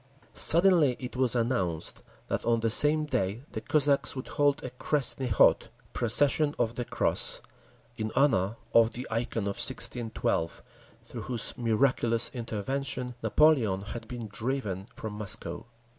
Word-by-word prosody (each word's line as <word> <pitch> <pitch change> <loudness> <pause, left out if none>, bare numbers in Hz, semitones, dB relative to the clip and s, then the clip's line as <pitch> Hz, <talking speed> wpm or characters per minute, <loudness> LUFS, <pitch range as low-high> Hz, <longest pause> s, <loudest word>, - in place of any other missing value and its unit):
Suddenly 170 -6 +5
it 125 -1 -7
was 125 -2 +1
announced 105 -9 -2 0.2
that - - -3
on 115 -1 +1
the 115 -1 +1
same 150 +5 +4
day 105 -3 -2
the - - -5
Cossacks 145 -2 +1
would 130 - -7
hold 145 -1 0
a 125 - -6
Krestny 130 0 -1
Khod—Procession 140 +6 +2
of 115 -1 -1
the 120 0 -4
Cross—in 110 -1 -2
honour 115 -7 +2 0.2
of 115 0 +4
the 125 - -6
Ikon 115 -1 -2
of 100 0 -1
1612, 115 -9 0 0.4
through - - -9
whose 120 -3 0
miraculous 115 -1 +1
intervention 125 +2 -4
Napoleon 120 -12 +2
had 115 +3 -8
been 120 -3 -7
driven 105 -3 -4
from 110 -1 -7
Moscow. 105 +2 -4
120 Hz, 130 wpm, -28 LUFS, 110-135 Hz, 0.4 s, Suddenly